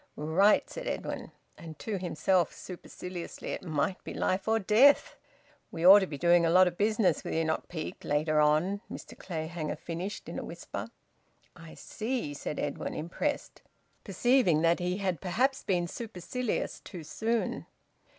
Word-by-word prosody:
"Right!" 165 +8 +3
said - - -7
Edwin; - - -4 0.3
and 160 -2 -9
to 205 +2 -3
himself, 175 0 +1
superciliously: 180 -1 -8
"It - - -3
might 160 +2 -2
be - - -7
life 190 +2 0
and 220 -2 +1
death." 255 +8 +5 0.6
"We 165 0 -3
ought 195 +3 +11
to 190 - -1
be 145 - -6
doing 170 +2 +4
a 165 - +3
lot 185 +2 +7
o' 180 - +1
business 210 +2 +1
wi' - - -4
Enoch 160 -1 0
Peake, 160 -3 -6
later 155 +1 +1
on," 155 +7 +2
Mr - - -8
Clayhanger 160 -2 -4
finished, 180 +5 -5
in - - -5
a - - -5
whisper. - - -7 0.7
"I 165 -1 -12
see," 225 - -3
said 145 +1 -5
Edwin, 145 -1 -3
impressed, 175 - -3 0.4
perceiving 240 - +3
that 170 +2 +3
he 180 +1 -1
had 185 -4 -2
perhaps 255 +9 +1
been 175 -3 0
supercilious 225 +4 -4
too 175 -4 -9
soon. 225 +9 -2
180 Hz, 155 wpm, -30 LUFS, 160-210 Hz, 0.7 s, ought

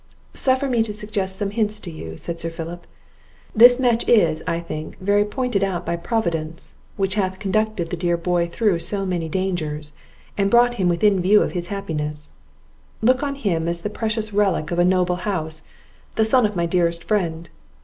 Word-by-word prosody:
"Suffer 260 +1 +2
me 240 -3 +2
to 215 -2 -2
suggest 205 -3 -2
some 200 0 -2
hints 210 -1 0
to 175 - -7
you," 80 - -8
said 170 -1 -2
Sir 165 - -1
Philip. 165 +1 -7 0.7
"This 245 +3 +8
match 240 -3 +1
is, 165 -9 +4
I 165 - 0
think, 155 -2 -7
verily 205 +2 +2
pointed 230 -2 -1
out 180 -3 -2
by 170 - -1
Providence, 170 -4 -2 0.2
which 195 -1 +1
hath 190 -2 -1
conducted 215 -3 -1
the - - -1
dear 175 0 0
boy 170 0 0
through 205 -4 +1
so 195 +3 0
many 175 -3 -2
dangers, 155 -5 -3 0.5
and 195 0 +3
brought 240 +2 +5
him 180 - +3
within 195 +3 +3
view 200 +4 +5
of - - -3
his 175 -2 -4
happiness; 150 -6 -4 0.7
look 255 +3 +4
on 280 -1 -2
him 175 -11 -1
as 170 0 -1
the 210 - -4
precious 215 -1 -2
relic 195 -6 +1
of 175 - -1
a - - +5
noble 180 -1 +2
house, 160 -5 -3 0.5
the 220 - +3
son 230 0 +4
of 210 - -8
my 170 -1 +1
dearest 170 -1 0
friend! 170 -6 -1
190 Hz, 190 wpm, -22 LUFS, 170-215 Hz, 0.7 s, This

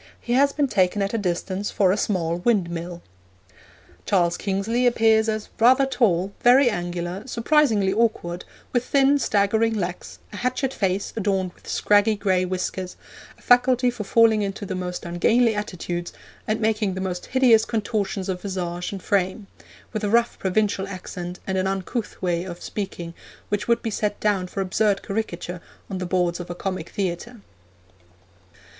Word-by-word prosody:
He 240 - -3
has 280 +2 +4
been 285 0 +1
taken 195 -2 +1
at 195 - -2
a - - +1
distance 185 +1 -2
for 190 -3 +2
a - - +2
small 175 -5 -1
windmill.' 175 -4 -1 1.0
Charles 175 -3 +2
Kingsley 215 +6 0
appears 225 -2 +3
as 215 -1 -3
'rather 255 +4 +6
tall, 200 -8 +1
very 250 0 +6
angular, 175 +3 -4
surprisingly 230 -6 +2
awkward, 195 -6 0 0.3
with 245 -1 +2
thin 280 +2 +3
staggering 220 +1 +2
legs, 180 -3 -4 0.2
a - - -6
hatchet 255 +3 -1
face 195 -1 -1
adorned 190 -4 -1
with - - -21
scraggy 205 +1 +3
gray 190 -3 +1
whiskers, 185 0 -3 0.4
a - - -22
faculty 250 0 +4
for 240 -3 -6
falling 220 +1 +4
into 200 +1 -3
the 190 - -4
most 180 -1 -4
ungainly 225 +7 +3
attitudes, 180 -4 -4 0.4
and 215 +1 0
making 215 -3 0
the - - -4
most 185 -2 -4
hideous 245 -4 +5
contortions 210 -4 -2
of 185 -2 -3
visage 180 -3 -4
and 195 -2 -7
frame; 195 +1 0 0.5
with 215 -1 -3
a 205 - +1
rough 235 +2 +2
provincial 195 0 0
accent 180 -2 -7
and 190 -1 -1
an 185 - 0
uncouth 195 +4 -3
way 175 -1 0
of 175 -2 -7
speaking 175 -5 -5 0.4
which 205 0 -1
would 235 0 +2
be 225 - -2
set 205 0 -2
down 200 -3 +1
for 195 - -4
absurd 195 +1 +1
caricature 180 -4 -4 0.3
on 190 - -3
the 180 - -3
boards 175 -1 0
of 175 - -7
a 175 - -4
comic 185 -2 -4
theatre.' 200 +5 -4
200 Hz, 165 wpm, -23 LUFS, 180-225 Hz, 1.0 s, rather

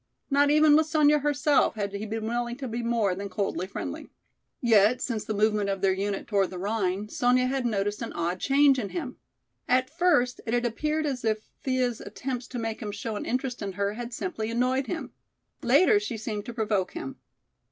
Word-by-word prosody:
Not 285 +1 +4
even 305 0 +6
with 310 0 +4
Sonya 300 -1 +4
herself 290 -2 +2
had 200 -2 -3
he 205 +2 -4
been 220 +1 -3
willing 240 +1 -2
to 270 -1 -5
be 235 +1 -3
more 230 -5 +1
than 200 +2 -5
coldly 190 -1 -2
friendly. - - -6 0.5
Yet 225 0 +4
since 230 -5 -2
the 215 - -3
movement 210 -1 +2
of 195 -1 -2
their 195 -1 +3
unit 195 +1 -2
toward 200 -3 +1
the 185 - -7
Rhine, 200 0 -1
Sonya 250 +3 +2
had 260 -1 0
noticed 205 -1 -1
an 230 - -4
odd 175 +2 -2
change 275 +1 +4
in 205 -5 -3
him. 275 -8 -5 0.5
At 255 +1 +2
first 295 -8 +2
it 230 - +1
had 245 0 0
appeared 300 +7 -1
as 265 -4 -2
if 215 -1 -1
Thea's 255 -3 0
attempts 250 +4 -5
to 250 - -6
make 225 -1 -3
him 210 -2 -4
show 215 +2 -4
an - - -5
interest 255 0 -2
in 195 -1 -4
her 200 +1 -1
had 240 +2 -6
simply 235 -5 -3
annoyed 255 +3 0
him. 345 - -4 0.5
Later 410 +3 +5
she 270 - -4
seemed 215 -1 -4
to 240 - -5
provoke 210 -5 0
him. 135 - -6
235 Hz, 205 wpm, -27 LUFS, 205-260 Hz, 0.5 s, even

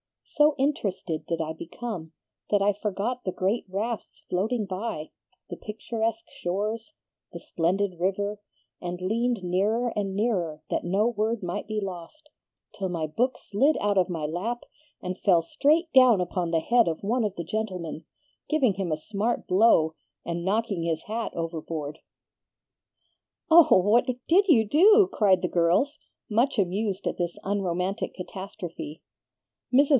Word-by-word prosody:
So 295 0 +3
interested 205 - -1
did 165 -1 -1
I 160 0 -3
become 170 0 -7 0.4
that 205 -1 +3
I 205 +1 +3
forgot 210 +5 -3
the 185 - -1
great 195 +6 0
rafts 215 +4 -4
floating 215 +5 0
by, 190 -4 -4 0.4
the - - -5
picturesque 225 +1 -3
shores, 215 - -3 0.4
the - - -7
splendid 180 +2 -1
river, 200 +3 -1 0.4
and 175 0 -4
leaned 225 +3 0
nearer 205 +7 +1
and 195 -2 -2
nearer 180 -8 -1
that - - 0
no 200 +6 +2
word 220 -1 -1
might 180 +4 -3
be 215 0 -2
lost, 195 - -7 0.4
till 190 -2 -3
my 165 -3 -2
book 245 +12 0
slid 270 +9 +1
out 205 -1 +2
of 185 - +1
my 165 -4 -3
lap 195 +10 -3 0.4
and 180 +1 -4
fell 175 -5 +4
straight 310 - +2
down 255 -6 +7
upon 180 -1 -1
the 165 -1 +1
head 235 +5 +3
of 165 +2 -2
one 235 +4 +1
of 205 -3 -2
the 170 - -4
gentlemen, 180 -5 -4 0.4
giving 275 -9 +3
him 190 -3 -3
a 155 - 0
smart 215 +8 -2
blow, 180 -5 +4 0.3
and 170 0 -3
knocking 205 -2 0
his 165 -1 -1
hat 225 +2 -3
overboard." 160 -2 -4 1.5
"Oh, 330 - +8
what 210 +6 +3 0.2
DID 390 +4 +5
you 240 - +5
do?" 395 - +6
cried 190 -4 +3
the - - +2
girls, 180 - +2 0.3
much 235 +5 +1
amused 200 +1 -1
at - - -1
this 175 -1 -2
unromantic 190 0 -2
catastrophe. 180 -4 -7 0.7
Mrs. 275 +3 +5
200 Hz, 150 wpm, -26 LUFS, 175-230 Hz, 1.5 s, Oh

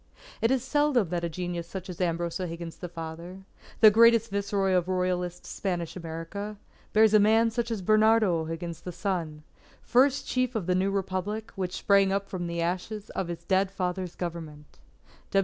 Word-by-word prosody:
It 225 - +3
is 260 -1 +1
seldom 265 - +2
that 175 0 -2
a 170 - -1
genius 175 0 -4
such 190 +1 -7
as 180 -1 -7
Ambrose 170 0 -1
O'Higgins 170 -2 -5
the 180 - -7
father, 170 +3 -8 0.4
the 215 -2 +9
greatest 230 0 +5
Viceroy 200 -1 0
of 180 -1 +2
royalist 180 -1 -1
Spanish 175 -3 -3
America, 185 +5 -6 0.3
bears 220 0 +5
a 215 - +7
man 225 +2 +4
such 235 +1 -2
as 220 -5 -3
Bernardo 215 -3 +4
O'Higgins 165 +1 -5
the 180 - -6
son, 170 -4 -3 0.4
first 265 +3 +3
chief 255 -1 0
of 210 -6 -1
the 180 - +1
new 185 +2 +1
Republic 195 +2 -3
which 185 -2 -3
sprang 200 -1 +4
up 195 0 -1
from 175 -2 -4
the 170 0 -2
ashes 185 +4 -3
of 190 - -3
his 170 -1 -6
dead 190 +2 +2
father's 185 -2 -3
Government. 160 -4 -7
185 Hz, 175 wpm, -27 LUFS, 170-210 Hz, 0.4 s, the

